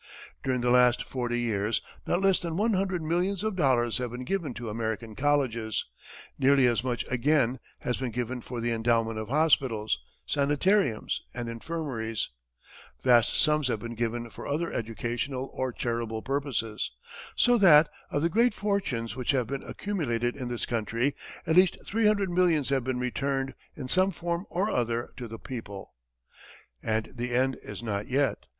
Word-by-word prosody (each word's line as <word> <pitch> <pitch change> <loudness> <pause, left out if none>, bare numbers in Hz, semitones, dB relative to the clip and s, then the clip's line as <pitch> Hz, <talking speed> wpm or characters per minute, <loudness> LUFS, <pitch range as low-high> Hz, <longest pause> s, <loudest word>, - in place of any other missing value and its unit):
During 130 -2 0
the 120 0 +2
last 125 0 +5
forty 120 -2 -2
years, 110 -2 0 0.3
not 175 - +1
less 195 -1 +5
than 170 -1 -3
one 220 +3 +2
hundred 190 -3 0
millions 180 +5 0
of 215 -2 -1
dollars 125 -8 +2
have 125 -1 -2
been 125 +2 -6
given 170 -2 -1
to 120 0 -6
American 110 0 -3
colleges; 130 -5 0 0.5
nearly 135 0 +5
as 120 -1 +2
much 125 -2 -1
again 130 -1 +2 0.2
has 125 - -1
been 130 -2 -2
given 125 +2 -3
for 125 0 -6
the 120 +1 0
endowment 115 -1 +1
of 110 - -5
hospitals, 130 - +2 0.2
sanitariums 145 - +1
and 120 -1 -3
infirmaries; 115 -3 -3 0.7
vast 120 -3 +5
sums 150 -2 +3
have 120 - 0
been 120 +2 -6
given 120 0 -2
for - - -8
other 155 +4 -1
educational 120 +4 -3
or 130 -1 -1
charitable 115 -2 -3
purposes, 135 -6 -2 0.5
so 245 -1 +4
that, 160 -5 +8 0.2
of 145 - -1
the - - +4
great 235 +7 +3
fortunes 165 - -1
which 125 -2 -5
have 130 -4 +3
been 135 +4 -4
accumulated 120 - -2
in 130 -3 -5
this 120 -1 -2
country, 115 +4 0 0.3
at 160 - +1
least 185 0 +5
three 220 +1 +2
hundred 200 -3 +2
millions 170 -6 +3
have 135 -2 +1
been 130 0 -1
returned, 135 +2 -1 0.2
in 130 -4 -6
some 185 +7 +3
form 170 0 -3
or 190 +4 0
other, 120 -1 -1
to 125 - -6
the 115 0 -7
people. 110 -6 -8 0.9
And 110 0 0
the 120 0 -2
end 130 +1 +2
is - - -8
not 105 -2 -2
yet. 140 +2 0
125 Hz, 170 wpm, -28 LUFS, 115-155 Hz, 0.9 s, that